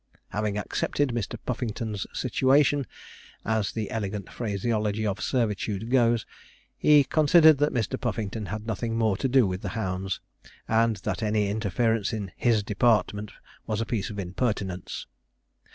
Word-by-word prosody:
Having 105 0 -2
'accepted 140 +6 -1
Mr. 115 -5 -3
Puffington's 110 -4 -3
situation,' 140 +1 +2 0.6
as 110 -2 0
the 110 -2 -4
elegant 100 -3 -4
phraseology 110 -1 -1
of 105 0 -2
servitude 110 -2 -1
goes, 120 -3 +3 0.5
he 150 -1 +6
considered 155 +1 +5
that 145 +1 +2
Mr. 120 +2 -2
Puffington 110 -3 -3
had 105 +4 -5
nothing 115 +1 -2
more 110 -3 +2
to 135 - 0
do 130 -2 +4
with 95 0 -3
the - - -4
hounds, 95 -2 -2 0.5
and 115 0 +3
that - - -2
any 105 -1 +1
interference 110 +1 0
in 100 -4 -4
'his 115 -4 +2
department' 105 -1 +1 0.4
was 110 -1 -1
a 115 - -1
piece 110 -4 -2
of 105 - -7
impertinence. 95 -1 -3
110 Hz, 140 wpm, -26 LUFS, 105-120 Hz, 0.6 s, he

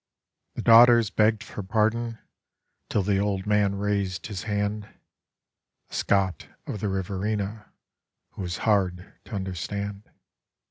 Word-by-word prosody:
The - - -4
daughters 115 -1 +7
begged 110 0 +2
for - - -7
pardon 110 +3 0 0.7
till 105 - +1
the 100 0 +1
old 100 -2 -1
man 105 -1 +2
raised 100 -4 -1
his 100 -5 -5
hand 105 0 -2 1.0
A - - -13
Scot 95 -2 0 0.2
of 105 - -5
the 105 - -1
Riverina 100 +2 -3 0.6
who - - -8
was 90 0 -3
hard 95 -4 +1
to 115 - -7
understand. 100 +2 -4
100 Hz, 125 wpm, -26 LUFS, 95-105 Hz, 1.0 s, daughters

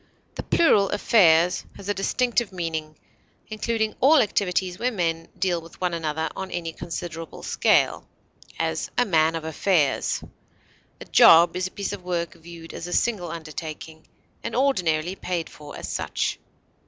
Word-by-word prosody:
The - - -5
plural 205 -12 +3
affairs 180 -5 +4
has 200 - -10
a 205 - +1
distinctive 240 +3 0
meaning, 160 -4 -4 0.5
including 220 0 -1
all 300 +5 +6
activities 185 -4 0
where 250 +1 0
men 165 -5 -2
deal 180 -2 0
with 165 0 -15
one 180 -2 -1
another 160 -1 -2
on 190 0 -5
any 170 -2 -4
considerable 165 -1 -7
scale; - - +2 0.5
as, - - -2
a 245 - +4
man 160 -4 +3
of 165 - -4
affairs. 160 -1 +1 0.8
A - - -9
job 170 +1 +7
is 185 0 -1
a - - -12
piece 200 0 -2
of 195 -3 -7
work 175 -1 -2
viewed 165 0 -12
as 170 - -6
a 175 - -5
single 205 -8 0
undertaking, 160 -1 -8 0.4
and 230 - -4
ordinarily 180 - +1
paid 175 -4 -4
for 150 -1 -11
as - - -6
such. - - -2
175 Hz, 155 wpm, -24 LUFS, 165-200 Hz, 0.8 s, job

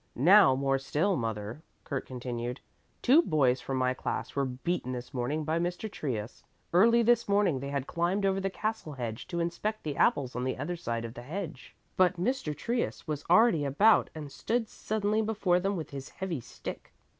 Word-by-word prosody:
Now 170 - +7
more 135 0 +1
still, 160 +8 0
mother," 110 +1 -4 0.2
Kurt 140 -2 -4
continued. 125 -1 -4 0.4
"Two 275 +7 +7
boys 135 - +2
from 135 - -3
my 130 0 +2
class - - -4
were 140 -1 +1
beaten 130 +1 -2
this 125 0 -7
morning 135 +5 -1
by 160 +2 0
Mr. 180 +5 -3
Trius. 120 - -4 0.3
Early 230 +6 +6
this 235 -1 +3
morning 200 -8 +3
they 140 +1 -5
had 140 -2 -2
climbed 180 +6 0
over 195 0 +2
the 195 0 -1
castle 215 -5 -3
hedge 120 -4 -5
to 170 - -3
inspect 170 +6 -2
the 145 -2 -4
apples 130 -3 +2
on 125 - -2
the 130 0 -1
other 150 +7 -3
side 115 -8 -3
of 115 - -7
the 120 - -8
hedge. 165 +5 -7 0.2
But 180 -1 +3
Mr. 180 - -1
Trius 235 +1 -2
was 150 -2 -3
already 180 -4 +5
about 195 +11 +4
and 150 -3 -7
stood 230 - -1
suddenly 215 0 -1
before 205 -5 +1
them 195 +2 -1
with 160 -4 -5
his 135 -1 -7
heavy 185 -6 -4
stick. - - -8
155 Hz, 190 wpm, -29 LUFS, 130-200 Hz, 0.4 s, Now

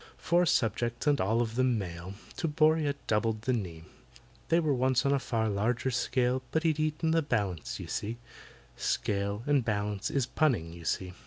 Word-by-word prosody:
Four 175 0 +2
subjects, 120 -1 0
and 145 -2 +3
all 110 +5 +2
of 115 -1 -5
them 125 -1 +2
male, 90 -1 -6 0.2
To 165 - -1
BORRIA 155 -1 +3
doubled 110 0 0
the 130 - +1
knee, 85 -8 -4 0.7
They 165 - +4
were 155 -4 +1
once 130 0 +2
on 140 - +3
a 140 - +2
far 115 -4 -1
larger 115 +5 0
scale, 125 +1 +1
But 160 - 0
he'd 160 -2 +1
eaten 155 +1 0
the 165 0 +3
balance, 100 - -2
you - - -6
see 110 +3 -3 0.6
("Scale" 100 +1 -1
and 145 -3 +3
"balance" 105 -2 -1
is 135 -3 +1
punning, 120 - 0
you 85 -1 -11
see). 90 +2 -2
120 Hz, 180 wpm, -30 LUFS, 105-145 Hz, 0.7 s, They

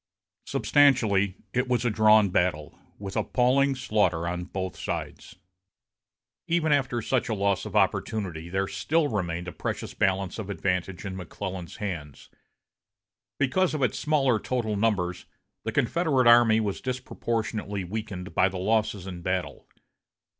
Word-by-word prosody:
Substantially, 110 -10 +3 0.2
it 125 +1 +1
was 125 -1 0
a 120 - +2
drawn 110 -1 +5
battle, 85 -5 0 0.2
with 100 -1 -7
appalling 135 +2 +2
slaughter 105 -9 +1
on 90 0 -3
both 95 0 -4
sides. - - -5 1.1
Even 165 -2 +1
after 130 -5 +1
such 130 0 0
a 110 - 0
loss 100 -1 0
of - - -9
opportunity, 90 -7 0
there 95 +2 -1
still 160 +7 +1
remained 90 -4 -2
a - - -4
precious - - -4
balance 95 +1 0
of 105 -2 -5
advantage 90 -1 -2
in 95 -1 -4
McClellan's 95 -1 -6
hands. 85 -9 -6 1.1
Because 155 +6 +1
of 145 - -1
its 125 - 0
smaller 135 -7 +2
total 115 -4 -2
numbers, 100 -5 0 0.4
the - - -1
Confederate 140 -1 +1
army 120 -2 +6
was 105 -3 -2
disproportionately 115 -5 -3
weakened 100 -1 -6
by 95 - +3
the 95 - -6
losses 105 0 0
in 90 -2 -7
battle. 90 +1 -3
105 Hz, 140 wpm, -27 LUFS, 95-125 Hz, 1.1 s, army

